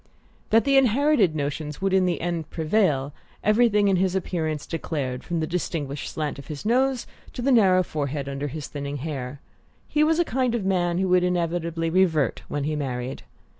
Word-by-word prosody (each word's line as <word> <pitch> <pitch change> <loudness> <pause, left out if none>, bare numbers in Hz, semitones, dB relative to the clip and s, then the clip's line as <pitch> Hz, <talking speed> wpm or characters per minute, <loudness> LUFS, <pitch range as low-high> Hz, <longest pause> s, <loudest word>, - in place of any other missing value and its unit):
That 225 +1 +5
the 275 0 +3
inherited 260 - +3
notions 150 0 -3
would 195 0 0
in 190 -1 +4
the 175 - -1
end 170 -3 -3
prevail, 155 -5 +1 0.3
everything 210 -1 +4
in 195 -2 +3
his 185 0 +1
appearance 160 -5 -2
declared 140 -6 -3
from 170 -2 -2
the - - +1
distinguished 155 -4 -3
slant 150 -2 -3
of 140 - -11
his 150 +2 -7
nose 255 +2 +2 0.3
to - - -5
the 275 - +3
narrow 190 -6 +5
forehead 145 -3 -3
under 140 +1 -3
his 150 +1 -6
thinning 140 0 -5
hair; 140 -2 -5 0.5
he 300 - +2
was 320 +1 +3
the 345 - +3
kind 255 -2 0
of 215 -5 -2
man 175 -2 +1
who 190 +1 +1
would 180 0 +4
inevitably 170 -2 -1
"revert" 160 -8 +2
when 145 - -3
he 155 +1 -1
married. 130 - -4
170 Hz, 185 wpm, -25 LUFS, 145-195 Hz, 0.5 s, That